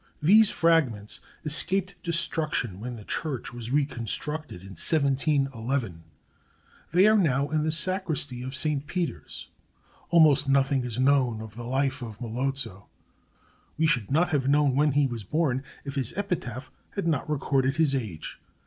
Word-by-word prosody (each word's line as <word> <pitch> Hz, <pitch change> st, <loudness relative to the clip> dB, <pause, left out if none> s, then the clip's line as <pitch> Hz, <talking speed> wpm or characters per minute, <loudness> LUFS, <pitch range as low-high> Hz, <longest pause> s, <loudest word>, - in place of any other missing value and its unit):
These 205 Hz, +7 st, +6 dB
fragments 135 Hz, -11 st, +1 dB, 0.3 s
escaped 185 Hz, +5 st, +3 dB
destruction 160 Hz, -, -1 dB
when 120 Hz, +3 st, -6 dB
the 110 Hz, -, -10 dB
church 135 Hz, 0 st, -4 dB
was 120 Hz, -1 st, -6 dB
reconstructed 145 Hz, -, -2 dB
in 95 Hz, -, -12 dB
1711. 135 Hz, -, +1 dB, 0.9 s
They 180 Hz, +4 st, +5 dB
are 215 Hz, +1 st, +5 dB
now 145 Hz, -8 st, +2 dB
in 155 Hz, -1 st, 0 dB
the 155 Hz, +1 st, 0 dB
Sacristy 160 Hz, -7 st, +1 dB
of 130 Hz, +2 st, -6 dB
Saint 145 Hz, 0 st, -1 dB
Peter's. 160 Hz, -, -5 dB, 0.6 s
Almost 150 Hz, -5 st, +5 dB
nothing 135 Hz, -1 st, +2 dB
is 120 Hz, -1 st, -4 dB
known 130 Hz, -4 st, +2 dB
of 110 Hz, -2 st, -9 dB
the 120 Hz, 0 st, -7 dB
life 135 Hz, +2 st, -1 dB
of 115 Hz, -3 st, -8 dB
Melozzo. 120 Hz, -4 st, -4 dB, 0.9 s
We 160 Hz, -, +2 dB
should 120 Hz, -10 st, +1 dB
not 165 Hz, +5 st, +2 dB
have 140 Hz, -5 st, 0 dB
known 145 Hz, -2 st, +3 dB
when 145 Hz, 0 st, +2 dB
he 145 Hz, 0 st, +3 dB
was 120 Hz, -4 st, -4 dB
born 135 Hz, -, 0 dB, 0.2 s
if 140 Hz, -, -5 dB
his 135 Hz, -4 st, -3 dB
epitaph 140 Hz, -, -4 dB, 0.2 s
had 200 Hz, -, -2 dB
not 155 Hz, -3 st, -1 dB
recorded 135 Hz, -2 st, 0 dB
his 155 Hz, -3 st, +2 dB
age. 110 Hz, -, -5 dB
140 Hz, 150 wpm, -26 LUFS, 120-155 Hz, 0.9 s, These